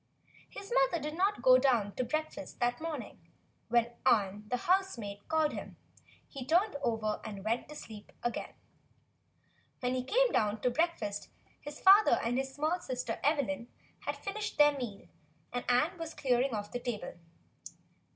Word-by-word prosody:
His 400 +3 -7
mother - - +3
did 300 +1 -4
not 395 +4 +1
go 255 0 +8
down 235 -7 +2
to 255 - -1
breakfast 310 +1 -4
that 245 +3 0
morning, 305 -8 -5
and 165 - -29 0.4
when 235 0 +3
Ann, 205 0 +2
the 250 - 0
housemaid, 245 - 0
called 315 -1 +2
him, - - -7 0.5
he 275 -3 -7
turned 345 - +2
over 220 -4 -1
and 200 -3 -7
went 230 +5 -1
to 300 - -9
sleep 215 -7 -10
again. 240 - -3 1.3
WTien 250 0 +1
he 255 -1 -1
came - - +3
down 210 0 +1
to 250 - +2
breakfast 240 -10 -1 0.3
his 295 0 -9
father 395 +3 +7
and 245 +2 0
his 270 0 -3
small 310 +6 0
sister 255 -4 -4
Evelyn 285 -4 0 0.3
had - - -4
finished 420 +2 -4
their 295 -1 +6
meal, 240 -7 -6 0.5
and 245 - -3
Ann 300 +8 +2
was 330 -1 -6
clearing 255 0 +1
off 205 0 -5
the 245 - -3
table. 240 -4 -4
255 Hz, 160 wpm, -32 LUFS, 235-320 Hz, 1.3 s, go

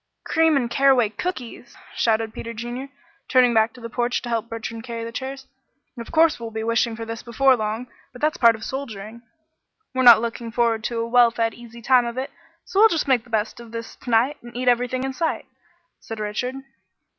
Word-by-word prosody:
"Cream 320 -2 +3
and 245 -3 0
caraway 255 -2 +3
cookies!" 240 - -6 0.2
shouted 225 -1 +1
Peter 230 - -6
Junior, 240 +4 -6 0.4
turning 250 -2 +4
back 220 0 +3
to 250 - -14
the 230 - -5
porch 240 +1 -1
to 240 - -5
help 230 -1 -2
Bertrand 230 0 -6
carry 230 -1 -5
the 230 - -6
chairs. 265 +2 -6 0.5
"Of 235 -2 -8
course 320 -2 +4
we'll 230 -1 -5
be 220 0 -5
wishing 230 0 +1
for 225 0 -6
this 225 0 -6
before 260 +3 +3
long, 220 +1 -3 0.3
but 250 - -13
that's 305 +2 0
part 230 -2 +5
of 220 - -10
soldiering." 230 -4 -6 0.7
"We're 260 - 0
not 240 -3 +9
looking 230 0 -4
forward 230 -1 +1
to 235 - -2
a 230 - -2
well 240 0 +5
fed, 230 -1 -1
easy 235 -1 -13
time 250 0 +4
of 235 +1 -6
it, 260 +1 -3 0.3
so 390 - -1
we'll 445 +1 +8
just 325 -6 -1
make 250 -4 +2
the - - -18
best 220 0 -1
of 235 -1 -12
this 230 0 -7
to - - -10
night, 240 +6 +3
and 240 0 -10
eat 255 0 -3
everything 250 +1 +2
in 265 0 -3
sight," 325 +4 -2 0.5
said 225 -1 -8
Richard. 215 +5 -3
235 Hz, 215 wpm, -23 LUFS, 225-255 Hz, 0.7 s, not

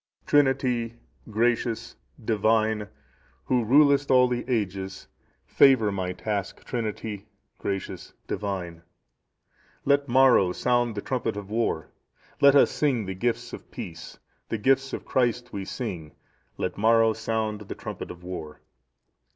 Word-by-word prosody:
"Trinity,(669) 130 -5 +2 0.3
Gracious, 115 +1 0 0.3
Divine, 110 -1 +1 0.6
Who 125 -2 +2
rulest 140 +4 +4
all 125 -1 +6
the 125 -1 -2
ages; 95 -5 -3 0.4
favour 125 -7 +5
my 95 -2 -2
task, 100 +1 -4
Trinity, 110 -3 -4 0.3
Gracious, 95 -1 -4
Divine. 90 -5 -4 1.0
"Let 140 0 +3
Maro 120 -8 +5
sound 120 0 +1
the 100 - -4
trumpet 115 -5 -2
of 100 0 -7
war, 110 -8 -1 0.5
let 140 -1 +6
us 140 - +6
sing 130 -8 0
the 95 - -4
gifts 115 +5 -2
of - - -9
peace; 85 -1 -8 0.3
the 115 - -1
gifts 135 +4 +2
of - - -5
Christ 120 -1 0
we 100 -1 -4
sing, 90 - -5 0.4
let - - -3
Maro 115 +1 +4
sound 110 -1 -2
the 105 - -7
trumpet - - -7
of 90 0 -10
war. 80 -4 -7
110 Hz, 125 wpm, -26 LUFS, 100-125 Hz, 1.0 s, all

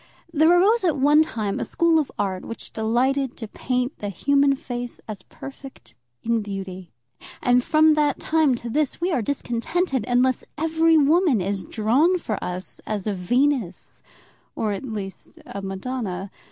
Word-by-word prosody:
There 315 +1 +4
arose 435 +5 +3
at 325 -5 +2
one 295 +3 +5
time 215 -10 -2
a - - -1
school 335 -1 +2
of 300 - -2
art, 190 -2 -2
which 230 - -8
delighted 250 +4 0
to 225 - -6
paint 250 +4 -2
the 205 - -4
human 280 +8 +2
face 245 -2 -6
as 210 -3 -7
perfect 270 +5 -12 0.3
in 230 -1 +1
beauty; 190 -3 -7 0.5
and 245 0 +3
from 310 +2 +4
that 295 -2 +1
time 310 -5 +2
to 235 0 -7
this 295 0 0
we 355 +2 0
are 265 - +1
discontented 265 - -1
unless 250 +1 +2
every 320 +1 +3
woman 305 - +4
is 195 +1 -2
drawn 260 - +2
for 220 - -4
us 180 +1 -5
as 210 -3 -3
a 210 - 0
Venus, 240 +1 -1 0.5
or, 215 -2 -1
at 200 - -5
least, 200 -6 -6
a 200 - -7
Madonna. 195 -1 -4
250 Hz, 160 wpm, -23 LUFS, 205-295 Hz, 0.5 s, one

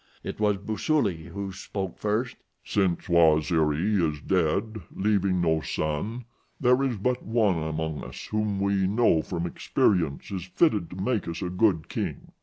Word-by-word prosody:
It - - -6
was 105 -2 +2
Busuli 105 - 0
who 100 +2 -5
spoke 95 -1 -5
first: 105 +4 -1 0.3
"Since 95 -4 0
Waziri 80 +2 +3
is 75 -3 0
dead, 95 +7 0
leaving 95 -3 +1
no 80 -2 +2
son, 100 - -3 0.3
there 125 0 +4
is 130 -5 0
but 125 +5 0
one 110 -7 +1
among 80 -1 -3
us - - -8
whom 105 -2 0
we 100 -1 +1
know 105 -5 +3
from 85 +2 -4
experience 85 -3 0
is 95 -3 -4
fitted 100 - +1
to - - -9
make 100 +2 -1
us 85 +3 -4
a 90 - -3
good 90 -4 +2
king. - - -4
95 Hz, 155 wpm, -26 LUFS, 85-105 Hz, 0.3 s, there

